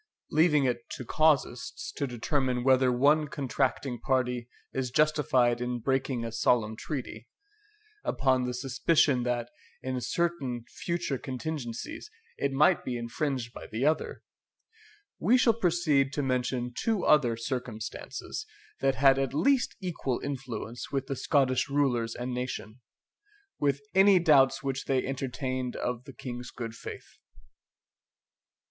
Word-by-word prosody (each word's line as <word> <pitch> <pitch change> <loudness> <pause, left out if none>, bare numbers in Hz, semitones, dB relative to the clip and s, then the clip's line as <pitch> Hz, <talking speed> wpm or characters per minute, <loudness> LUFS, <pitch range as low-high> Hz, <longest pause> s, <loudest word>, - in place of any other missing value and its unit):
Leaving 150 -2 +4
it 120 -2 -1
to 125 - -6
casuists 150 -4 +1
to 140 - -2
determine 125 0 -1
whether 130 -1 +4
one 145 +5 +3
contracting 135 -3 -1
party 125 -2 0 0.2
is 130 -1 -1
justified 130 -4 +2
in 125 0 -1
breaking 130 -1 -1
a 115 - -4
solemn 115 -1 +2
treaty, 120 -3 -6 0.8
upon 130 -1 +1
the 125 - -2
suspicion 135 +1 +2
that, 120 -1 -2 0.3
in 130 -1 -2
certain 135 -8 -1
future 170 -6 -3
contingencies, 150 - -5 0.3
it 140 - -1
might 150 +6 +4
be 125 -1 -3
infringed 120 +1 -3
by - - -9
the 115 +5 -2
other, 155 +1 0 1.0
we 245 +4 +4
shall 245 -2 +4
proceed 170 -9 +2
to 145 0 -2
mention 125 -1 -1
two 220 -5 0
other 125 -7 +4
circumstances 115 - -5 0.3
that 135 -1 +2
had 135 0 +5
at 135 0 -1
least 270 - +2
equal 155 -9 -2
influence 130 -4 -5
with 135 -1 -1
the 135 - -3
Scottish 135 -1 +1
rulers 125 -5 +1
and 125 +1 -4
nation, 125 -2 -5 0.8
with 140 -1 +1
any 195 0 +7
doubts 145 -6 +4
which 135 -1 -2
they 130 -1 +1
entertained 130 -1 -3
of 125 0 -3
the 135 - -10
King's 125 -1 -7
good 115 -2 -6
faith. 115 - -10
130 Hz, 130 wpm, -29 LUFS, 125-145 Hz, 1.0 s, any